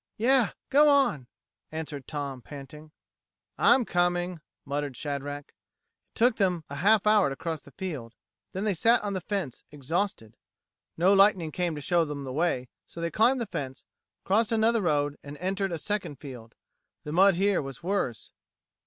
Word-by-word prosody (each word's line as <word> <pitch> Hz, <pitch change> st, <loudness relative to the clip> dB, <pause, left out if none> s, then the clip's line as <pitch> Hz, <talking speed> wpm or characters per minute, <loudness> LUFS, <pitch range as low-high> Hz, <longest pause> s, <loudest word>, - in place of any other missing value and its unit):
"Yeh 250 Hz, 0 st, +4 dB, 0.2 s
go 295 Hz, +2 st, +6 dB
on," 270 Hz, -, +3 dB, 0.4 s
answered 155 Hz, -4 st, -6 dB
Tom, 140 Hz, -3 st, -4 dB
panting. 150 Hz, +3 st, -11 dB, 0.7 s
"I'm 250 Hz, -, +5 dB
coming," 175 Hz, -2 st, 0 dB, 0.2 s
muttered 140 Hz, -2 st, -3 dB
Shadrack. 145 Hz, 0 st, -5 dB
It -, -, -29 dB, 0.6 s
took 240 Hz, 0 st, +3 dB
them 180 Hz, -5 st, +1 dB
a 140 Hz, -, -5 dB
half 210 Hz, +6 st, +4 dB
hour 210 Hz, -6 st, +5 dB
to 135 Hz, -, -4 dB
cross 160 Hz, +2 st, -4 dB
the -, -, -16 dB
field; 140 Hz, -, -6 dB, 0.4 s
then 190 Hz, -, -4 dB
they 210 Hz, -2 st, +1 dB
sat 230 Hz, +7 st, +3 dB
on 205 Hz, -1 st, -2 dB
the 190 Hz, -, -2 dB
fence 185 Hz, -, -4 dB
exhausted. 150 Hz, -, -3 dB, 0.6 s
No 180 Hz, +4 st, +4 dB
lightning 195 Hz, -5 st, +4 dB
came 175 Hz, 0 st, -1 dB
to 150 Hz, -, -6 dB
show 170 Hz, +4 st, +2 dB
them 145 Hz, -2 st, -5 dB
the 130 Hz, -1 st, -6 dB
way, 145 Hz, -5 st, 0 dB, 0.2 s
so -, -, -11 dB
they 170 Hz, 0 st, -2 dB
climbed 240 Hz, +8 st, +3 dB
the -, -, -1 dB
fence, 135 Hz, -9 st, -6 dB, 0.4 s
crossed 215 Hz, +4 st, +2 dB
another 225 Hz, 0 st, +3 dB
road, 145 Hz, -4 st, 0 dB
and 145 Hz, +1 st, -9 dB
entered 195 Hz, +2 st, -2 dB
a 170 Hz, -, -2 dB
second 205 Hz, -3 st, -3 dB
field. 125 Hz, -4 st, -11 dB, 0.5 s
The 150 Hz, -, -6 dB
mud 190 Hz, +3 st, +5 dB
here 195 Hz, +2 st, +2 dB
was 135 Hz, -1 st, -8 dB
worse. 180 Hz, -, -2 dB
170 Hz, 170 wpm, -28 LUFS, 145-200 Hz, 0.7 s, go